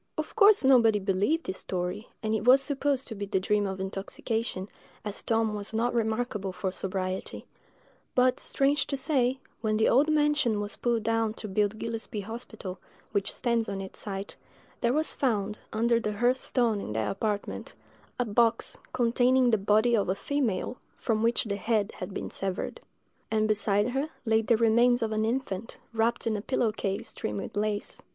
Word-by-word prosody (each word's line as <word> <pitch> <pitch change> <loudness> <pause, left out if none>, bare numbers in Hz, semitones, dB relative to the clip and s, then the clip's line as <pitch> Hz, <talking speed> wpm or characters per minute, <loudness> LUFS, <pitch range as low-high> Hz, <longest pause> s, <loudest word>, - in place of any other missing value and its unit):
Of 310 - -4
course 425 -4 +6
nobody 235 -5 +6
believed 200 - 0
this 185 - -3
story, 185 +4 -3 0.2
and 215 0 0
it 220 - 0
was 255 +3 +7
supposed 275 0 0
to - - -4
be 200 -1 -5
the 190 - +1
dream 205 +2 +1
of 190 0 -4
intoxication, 195 +1 -3 0.4
as 210 -1 -3
Tom 225 -1 +1
was 210 +1 -1
not 240 +2 +1
remarkable 220 -3 -1
for 185 +1 -3
sobriety; 185 0 -3 0.7
but, 255 0 +3
strange 280 +2 +1
to 275 - -1
say, 265 -2 +2 0.2
when 215 -2 0
the 220 - +3
old 290 +5 +4
mansion 295 -7 +2
was 205 0 -3
pulled 235 -2 0
down 225 -1 +1
to 215 - -6
build 205 +1 0
Gillespie's 225 -2 -4
hospital, 220 -3 -6 0.3
which 200 -2 0
stands 235 -2 0
on 195 -1 -3
its 190 0 -7
site, 195 -1 -5 0.4
there 235 - +2
was 310 +4 +1
found, 210 -5 0
under 230 +1 +2
the 210 -2 -2
hearth 245 +5 +2
stone 230 -6 +1
in 105 - -5
that 110 0 0
apartment, 205 0 -3 0.4
a 245 - +1
box 230 +2 +1
containing 250 +1 +3
the 220 - +4
body 215 +4 +3
of 200 -4 +1
a 185 - +1
female, 250 -3 -1 0.2
from 220 -3 0
which 230 +1 +2
the 200 -2 -3
head 215 -1 0
had - - -5
been - - -5
severed; 190 -1 -3 0.5
and 215 -1 +2
beside 210 0 +2
her 270 +4 -1 0.2
lay 220 0 +3
the 225 +1 +2
remains 235 +2 +4
of 220 - -1
an 215 0 +1
infant, 225 -4 -3 0.2
wrapped 230 +1 +1
in 225 -1 +1
a 205 - -2
pillow 235 -1 +1
case 195 -2 -3
trimmed 105 -1 -3
with - - -7
lace. 210 0 -2
220 Hz, 180 wpm, -28 LUFS, 205-245 Hz, 0.7 s, was